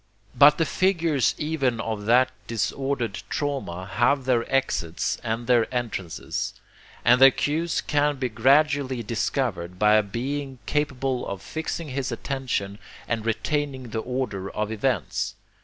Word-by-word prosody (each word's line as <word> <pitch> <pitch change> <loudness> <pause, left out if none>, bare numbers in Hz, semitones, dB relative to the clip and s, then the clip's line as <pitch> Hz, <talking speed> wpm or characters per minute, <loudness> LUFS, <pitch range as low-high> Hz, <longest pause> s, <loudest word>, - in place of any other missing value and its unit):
...[But] 145 +1 +7
the 165 - +2
figures 165 -7 +1
even 140 -6 0
of 110 -2 -4
that 130 +2 +5 0.2
disordered 120 0 -2
drama 135 - -3
have 135 +6 +1
their 125 -2 +1
exits 85 -11 0
and 115 +1 -2
their 120 -1 +3
entrances; 115 -9 -3 0.5
and 125 +2 +5
their 135 - +11
cues 155 +5 -1
can 145 0 +1
be 130 -1 -1
gradually 135 +2 +2
discovered 105 -6 -2
by 105 +2 +4
a - - +5
being 135 +6 -4
capable 135 -3 -1
of 100 -1 -5
fixing 160 0 -4
his 135 0 -2
attention 125 -7 -3 0.3
and 115 -1 -2
retaining 130 +2 -1
the 110 - -2
order 115 -6 -3
of 105 +2 -3
events. 110 - -1
130 Hz, 135 wpm, -25 LUFS, 110-140 Hz, 0.5 s, their